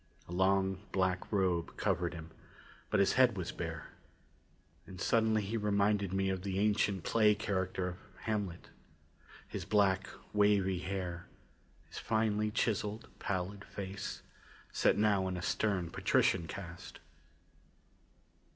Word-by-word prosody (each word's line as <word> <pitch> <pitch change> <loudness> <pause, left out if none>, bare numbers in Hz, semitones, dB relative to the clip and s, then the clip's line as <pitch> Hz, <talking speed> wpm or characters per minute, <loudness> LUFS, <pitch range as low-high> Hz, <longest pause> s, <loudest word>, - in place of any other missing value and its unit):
A - - -11
long 95 +1 +2
black 95 -1 0
robe 90 -5 0
covered 85 -1 0
him, 80 0 -9 0.6
but 105 - +2
his 100 - +4
head 125 -5 +4
was 90 -2 -3
bare. 80 -3 -5 1.0
And 95 -1 -10
suddenly 110 0 +2
he 105 +4 -2
reminded 100 -2 +1
me 95 0 +1
of 95 -1 -1
the 95 0 -3
ancient 100 -3 +2
play 105 -2 +4
character 95 -3 -1
of 90 - -8 0.2
Hamlet. 105 -6 -3 0.8
His - - -5
black, 95 -2 +2 0.2
wavy 100 -3 +3
hair; 90 -2 -4 0.6
his - - -8
finely 105 -1 +1
chiseled, 105 0 -1
pallid 100 +1 -3
face, 100 0 -6 0.5
set - - +3
now 100 -3 +3
in 90 -1 -2
a 90 - -5
stern 95 -6 0
patrician 80 - +2
cast. 85 -1 -8
95 Hz, 125 wpm, -33 LUFS, 90-105 Hz, 1.0 s, his